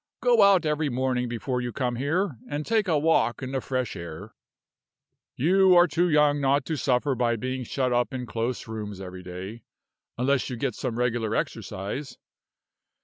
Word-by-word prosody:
Go 240 -3 +4
out 195 -4 +5
every 150 0 0
morning 125 -1 -1
before 125 +2 -2
you 120 0 -3
come 125 0 -2
here, 145 - -1
and 145 +1 -3
take 220 -3 +1
a 160 -4 +3
walk 145 -4 +2
in 130 - -4
the 135 -1 -1
fresh 130 -4 -2
air. 85 -3 -8 1.0
You 185 +5 +4
are 175 - +8
too 175 +2 +1
young 150 -2 +3
not 135 0 +2
to 160 - -2
suffer 135 0 +1
by 120 -1 +1
being 130 +3 -3
shut 125 +1 -1
up 120 +2 +1
in 130 -2 -4
close 115 +2 -3
rooms 105 -3 -6
every 90 -1 -8
day, 95 +5 -8 0.6
unless 130 +2 +1
you 125 - -4
get 130 0 -1
some 120 -1 -4
regular 120 -3 0
exercise. 105 +6 -4
130 Hz, 175 wpm, -26 LUFS, 115-150 Hz, 1.0 s, are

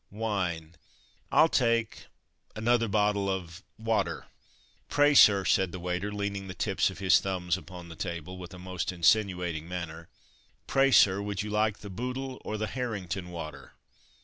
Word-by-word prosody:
wine! 95 -7 -3 0.6
I'll 160 - +6
take 115 -6 0 0.5
another 115 +1 +2
bottle 105 -1 +1
of 90 -2 -4 0.2
'water.'" 110 0 -1 0.6
"Pray, 145 0 +4
sir," 100 -8 +7
said 95 -2 +2
the 90 - -6
waiter 90 +3 -3
(leaning 100 -1 -3
the 95 - -7
tips 95 +2 +1
of 95 - -9
his 95 -1 +4
thumbs 90 -3 -1
upon 90 -2 -10
the 80 - -9
table) 85 +1 -5
with 90 0 -9
a - - -10
most 90 -1 -4
insinuating 90 -2 +1
manner 85 -2 -6 0.6
"Pray, 135 0 +3
sir, 100 -6 +5
would 100 -1 -3
you 105 - -5
like 105 0 0
the 105 - -8
Bootle 130 +5 -5
or 110 - -4
the 110 - -1
Harrington 100 -7 -4
water?" 80 -3 -8
95 Hz, 155 wpm, -29 LUFS, 90-110 Hz, 0.6 s, sir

